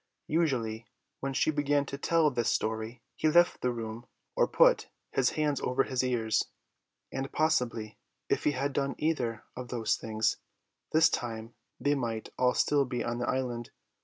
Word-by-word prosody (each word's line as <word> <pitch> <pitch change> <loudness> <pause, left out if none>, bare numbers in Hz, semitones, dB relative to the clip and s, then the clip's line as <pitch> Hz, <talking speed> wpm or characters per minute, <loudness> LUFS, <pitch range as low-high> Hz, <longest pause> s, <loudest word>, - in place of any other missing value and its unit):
Usually 120 -9 0 0.3
when 135 0 -3
she 155 - +3
began 145 -1 +1
to 140 - -5
tell 155 +1 +2
this 120 -3 0
story 110 +2 -2
he 155 - +2
left 175 +2 +4
the 125 - +1
room 115 0 -6 0.3
or - - +4
put - - +4 0.2
his 130 -2 +3
hands 150 -3 +1
over 125 +2 +2
his 130 -1 -1
ears; 115 -3 +1 0.7
and 135 +1 -3
possibly 125 -9 0 0.3
if - - 0
he 150 - +3
had 140 +1 -1
done 140 0 0
either 125 -8 -1
of 125 0 -6
those 115 -3 0
things 110 -1 0 0.5
this 160 +1 +6
time 115 -5 -3 0.3
they 145 - +2
might 115 -5 -2
all 125 0 +3
still 145 -1 +3
be 125 -2 -3
on 120 0 -2
the 120 - -1
island. 120 -3 -2
125 Hz, 165 wpm, -30 LUFS, 115-145 Hz, 0.7 s, this